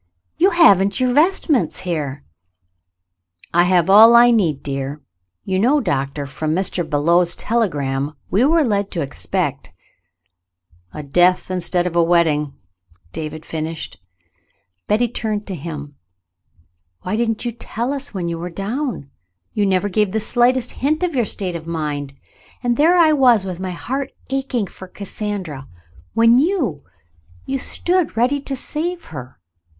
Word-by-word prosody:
"You 375 - +4
haven't 200 - +4
your 255 -1 +1
vest 330 +8 +3
ments 240 - +1
here! 150 -6 -4 0.7
" 90 -1 -27
"I 175 +1 +4
have 180 -2 +3
all 220 +4 +8
I 240 +1 +7
need, 170 - +1
dear. 140 +1 -4 0.5
You 190 -1 0
know. 260 +8 +3
Doctor, 140 - -2
from 155 +3 -3
Mr. 185 -1 0
Belew's 170 +4 +2
telegram 145 - -1 0.2
we 205 +6 +3
were 320 +3 +4
led 205 -5 0
to 170 - -2
expect 85 - -3 0.4
— 90 0 -54
" 90 - -60 0.3
"A 150 - -7
death 180 +6 +2
instead 180 -1 0
of 175 -1 -3
a 170 - +4
wedding.''" 160 -4 +2 0.6
David 155 0 -6
finished. 160 - -5 0.9
Betty 225 +4 +2
turned 215 -3 -3
to 195 - -6
him. 150 -3 -7 1.1
"Why 185 - -2
didn't 225 0 -1
you 240 - -1
tell 235 +2 -4
us 280 0 -4
when 185 -4 -4
you 170 -1 -3
were 175 +1 -5
down? 200 - -4 0.4
You 205 -1 +1
never 190 +1 +1
gave 205 0 0
the 220 - +1
slightest 245 +3 +2
hint 310 +6 -1
of 355 -2 0
your 245 -4 +1
state 185 -3 -2
of 165 -1 -7
mind, 145 -4 -4 0.5
and 240 -1 +1
there 330 +7 +4
I 320 -3 +5
was 245 -8 +4
with 185 -2 -5
my 185 0 -4
heart 260 +10 -4 0.2
aching 265 -5 -1
for 190 0 -12
Cassandra, 190 -8 -6 0.5
when 230 +2 +5
you 280 - 0 0.3
— 85 +2 -29
you 270 0 -2
stood 355 0 -1
ready 255 +5 +2
to 275 0 -4
save 335 +6 -4
her. 130 -3 -9
185 Hz, 155 wpm, -19 LUFS, 155-240 Hz, 1.1 s, all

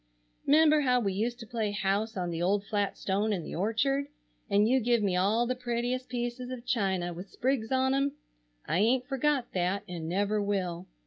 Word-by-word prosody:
'Member 305 +1 +5
how 250 -3 +3
we 200 -5 -1
used 235 +5 -2
to - - -7
play 220 -1 -2
house 205 +2 -1
on 175 -1 -2
the 165 0 -3
old 200 +3 +1
flat 205 -1 -1
stone 205 +3 0
in 185 -5 -1
the - - -7
orchard, 240 - 0 0.4
and 205 +1 +4
you 260 +3 +4
give 235 -2 +2
me 190 -3 +1
all 205 +6 +2
the 250 - 0
prettiest 245 +1 -2
pieces 245 0 -3
of 255 -1 -7
china 190 -7 0
with 180 +3 -9
sprigs 255 -3 -1
on 260 0 +2
'em? 275 +1 +1 0.5
I 165 - 0
aint 245 +4 +3
forgot 270 -1 0
that, 185 +2 0
and 165 -2 -5
never 205 +3 +1
will. 185 -3 -2
220 Hz, 195 wpm, -29 LUFS, 195-250 Hz, 0.5 s, Member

